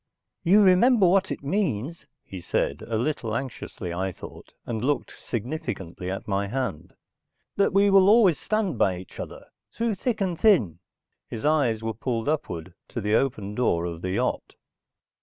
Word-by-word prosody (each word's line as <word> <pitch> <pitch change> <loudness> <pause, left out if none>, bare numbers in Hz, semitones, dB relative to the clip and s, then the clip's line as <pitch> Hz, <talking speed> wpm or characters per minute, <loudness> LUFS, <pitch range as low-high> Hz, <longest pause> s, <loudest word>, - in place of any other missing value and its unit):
"You 200 +5 +6
remember 200 +4 +5
what 190 +2 +3
it - - -5
means," 150 - -2 0.2
he 95 -2 -9
said, - - -1
a 115 - -1
little 115 -3 -2
anxiously 115 -8 -5
I 95 +2 -2
thought, - - -12
and 110 -1 -3
looked 145 +2 -1
significantly 105 - -4
at 95 - -5
my 100 -1 0
hand. 125 - -4 0.6
"That 200 - +2
we 200 +1 +4
will 195 0 +6
always 210 -7 +5
stand 210 - -1
by 95 -2 +2
each 90 - -11
other, - - -7 0.3
through 230 -1 -1
thick 225 +4 -2
and 180 -4 -1
thin." 115 - +3 0.5
His 115 - -6
eyes 135 -8 +2
were 110 0 -2
pulled 115 +2 -3
upward 95 - -3
to - - -5
the 105 -1 -1
open 110 -5 0
door 85 -8 +1
of 85 -1 -5
the 95 - -3
yacht. - - -2
125 Hz, 165 wpm, -25 LUFS, -, 0.6 s, You